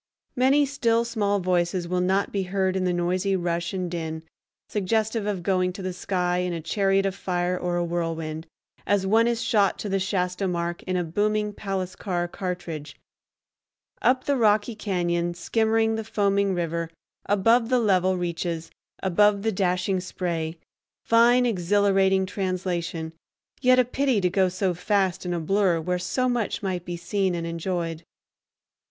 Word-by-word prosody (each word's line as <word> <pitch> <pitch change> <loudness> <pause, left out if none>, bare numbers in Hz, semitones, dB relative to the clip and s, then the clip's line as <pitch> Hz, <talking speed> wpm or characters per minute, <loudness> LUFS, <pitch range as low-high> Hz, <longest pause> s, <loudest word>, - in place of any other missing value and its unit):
Many 270 +3 +4
still 235 -4 +1
small 205 -3 0
voices 175 -1 0
will 180 +1 0
not 190 +2 +1
be 200 - -1
heard 190 0 0
in 185 -1 0
the 180 - +2
noisy 180 +3 0
rush 170 -2 -1
and 185 -2 -3
din, 160 -2 -4 0.4
suggestive 215 +2 0
of 195 -4 -2
going 185 -1 +1
to 195 - -8
the 185 0 -3
sky 180 -1 -1
in 180 -1 -1
a 165 - -3
chariot 195 +4 +1
of 195 - 0
fire 180 -1 -1
or 180 -1 -2
a 175 - 0
whirlwind, 165 -2 -3 0.4
as 200 -1 +2
one 225 +4 +4
is 235 0 0
shot 205 -5 +2
to 210 - -5
the 195 0 +1
Shasta 185 0 -1
mark 170 -1 -2
in 185 0 0
a 180 - 0
booming 210 +5 0
palace 190 -3 -4
car 175 -3 -2
cartridge; 175 -5 -5 1.1
up 255 +1 +3
the 285 - +1
rocky 215 0 +2
cañon, 175 -4 -1
skimming 225 +5 +1
the 220 0 -2
foaming 200 -2 +1
river, 170 -1 -2 0.4
above 225 +4 +3
the 255 - +3
level 190 -5 +2
reaches, 170 -1 -3 0.3
above 200 +2 +3
the 225 - +1
dashing 185 0 0
spray—fine 180 +8 0
exhilarating 195 -1 +2
translation, 180 -4 -3 0.5
yet 255 -1 +5
a 255 - +5
pity 260 -2 +1
to 180 -2 +1
go 190 0 +3
so 185 0 -1
fast 190 0 0
in - - -1
a - - -1
blur, 185 +1 +2
where 180 +3 -1
so 255 +8 0
much 240 -4 -1
might 180 -3 -2
be 175 0 -4
seen 190 +1 -1
and 170 -1 -3
enjoyed. 165 -1 -3
185 Hz, 160 wpm, -25 LUFS, 175-205 Hz, 1.1 s, yet